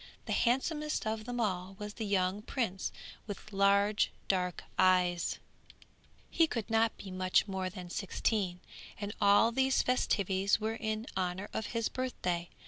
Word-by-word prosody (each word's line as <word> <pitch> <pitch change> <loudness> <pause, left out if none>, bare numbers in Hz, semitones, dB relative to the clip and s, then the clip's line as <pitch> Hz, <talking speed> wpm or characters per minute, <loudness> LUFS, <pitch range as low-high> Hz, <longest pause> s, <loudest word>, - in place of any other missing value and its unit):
The - - -1
handsomest 300 +5 +1
of 220 0 -2
them 245 0 -4
all 190 -3 -1
was 210 -1 -6
the 220 -1 -4
young 190 0 +1
prince 210 -5 -2 0.4
with 210 +1 -8
large 200 +1 +3 0.2
dark 180 -2 0
eyes; 180 -2 +3 0.9
he 330 - +4
could 230 -7 -4
not 225 0 +3
be 195 - -8
much 185 +2 +2
more 190 -1 -2
than 180 -2 -9
sixteen, 195 -2 -1 0.4
and 205 0 -4
all 205 +3 +6
these 265 +2 +2
festivities 200 -5 +2
were 220 +1 -1
in 220 0 -3
honour 185 +1 -2
of 220 - -2
his 230 -1 -1
birthday. 180 -9 -2
205 Hz, 145 wpm, -32 LUFS, 185-225 Hz, 0.9 s, all